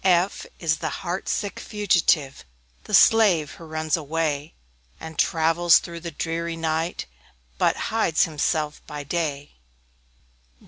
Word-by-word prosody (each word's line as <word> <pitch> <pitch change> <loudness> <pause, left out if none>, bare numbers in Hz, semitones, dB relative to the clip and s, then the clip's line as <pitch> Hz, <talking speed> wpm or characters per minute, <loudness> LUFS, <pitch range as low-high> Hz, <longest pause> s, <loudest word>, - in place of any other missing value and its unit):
F 185 0 +2
F - - -25
is 160 -2 0
the 160 - -3 0.2
heart 175 +2 -3
sick 205 -2 -2
Fugitive, 175 -9 +1 0.4
The - - -9
slave 195 -10 +5
who 165 - -12
runs 155 0 -1
away, 155 -1 -2 0.4
And 160 -1 -9
travels 165 +1 +4
through 170 -1 -6
the 170 0 -6
dreary 165 0 -3
night, 165 +1 -2 0.5
But - - +3 0.2
hides 195 -8 +2
himself 155 -1 -1
by 150 -1 -6
day. 145 -2 -3
165 Hz, 130 wpm, -24 LUFS, 155-175 Hz, 0.5 s, slave